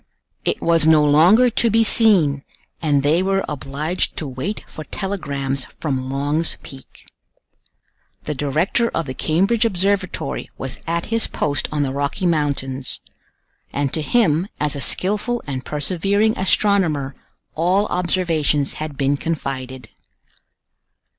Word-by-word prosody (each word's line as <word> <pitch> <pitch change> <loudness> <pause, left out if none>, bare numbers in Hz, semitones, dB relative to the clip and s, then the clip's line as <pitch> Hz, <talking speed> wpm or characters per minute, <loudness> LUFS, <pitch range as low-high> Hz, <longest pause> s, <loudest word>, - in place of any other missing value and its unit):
It - - -1
was 165 -2 +4
no 155 -2 +6
longer 180 +12 +5
to 230 +1 +2
be 225 +1 +4
seen, 180 -12 +4 0.4
and 145 -4 +2
they 155 +5 +3
were 195 +1 0
obliged 150 +4 -2
to 155 - -3
wait 135 +11 -5
for 155 - -9
telegrams 140 -9 -3
from 130 -4 -2
Long's 145 +4 0
Peak. 135 -1 -12 1.2
The 150 - -3
director 155 - 0
of 165 - -1
the 130 - -5
Cambridge 195 - +1
Observatory 195 -7 -1
was 135 -1 -6
at 170 +1 -1
his 230 - +2
post 145 -1 -1
on 150 -1 0
the 135 - -1
Rocky 145 +7 -2
Mountains; 140 -5 -1 0.7
and 140 -1 -2
to 160 - 0
him, 175 -2 +2
as 150 -1 +1
a 140 - -3
skillful 210 - 0
and 130 -3 -4
persevering 195 +8 +1
astronomer, 180 -8 +1 0.4
all 180 +5 +2
observations 165 -7 0
had 155 -3 -5
been 140 +1 +1
confided. 130 -5 -4
155 Hz, 130 wpm, -20 LUFS, 140-190 Hz, 1.2 s, no